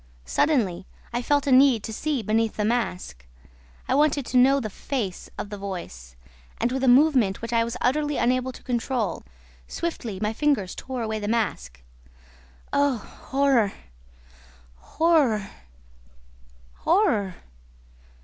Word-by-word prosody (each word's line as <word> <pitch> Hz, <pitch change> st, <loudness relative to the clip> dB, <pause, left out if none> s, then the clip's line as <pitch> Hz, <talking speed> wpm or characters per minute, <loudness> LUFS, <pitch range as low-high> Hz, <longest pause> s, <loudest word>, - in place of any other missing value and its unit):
Suddenly, 195 Hz, -, +1 dB, 0.3 s
I 240 Hz, -, -1 dB
felt 285 Hz, +2 st, +1 dB
a 280 Hz, -, +1 dB
need 255 Hz, -4 st, +5 dB
to 220 Hz, -, -5 dB
see 285 Hz, 0 st, -2 dB
beneath 220 Hz, +2 st, 0 dB
the 210 Hz, -, 0 dB
mask. 180 Hz, -, -2 dB, 0.6 s
I -, -, +1 dB
wanted 290 Hz, -1 st, +2 dB
to 255 Hz, -, 0 dB
know 270 Hz, +3 st, +5 dB
the 215 Hz, -5 st, -5 dB
FACE 210 Hz, -6 st, -4 dB
of 205 Hz, -, -6 dB
the 205 Hz, -, -6 dB
voice, 170 Hz, -, -7 dB, 0.4 s
and, 240 Hz, -, 0 dB
with 265 Hz, +1 st, -2 dB
a -, -, +2 dB
movement 255 Hz, -6 st, +4 dB
which 230 Hz, +1 st, -4 dB
I 230 Hz, 0 st, +3 dB
was 235 Hz, +1 st, -4 dB
utterly 295 Hz, +3 st, +1 dB
unable 255 Hz, +2 st, +1 dB
to -, -, -14 dB
control, 240 Hz, -5 st, -2 dB, 0.5 s
swiftly 245 Hz, -, -4 dB
my 210 Hz, +1 st, -1 dB
fingers 245 Hz, -8 st, 0 dB
tore 255 Hz, -3 st, -5 dB
away 220 Hz, -1 st, -2 dB
the 205 Hz, -, -4 dB
mask. 65 Hz, -, -2 dB, 0.9 s
Oh, 285 Hz, -3 st, +2 dB
horror, 260 Hz, -1 st, 0 dB, 1.0 s
horror, 260 Hz, -, +1 dB, 1.3 s
horror!" 240 Hz, -, +1 dB
235 Hz, 135 wpm, -25 LUFS, 205-275 Hz, 1.3 s, need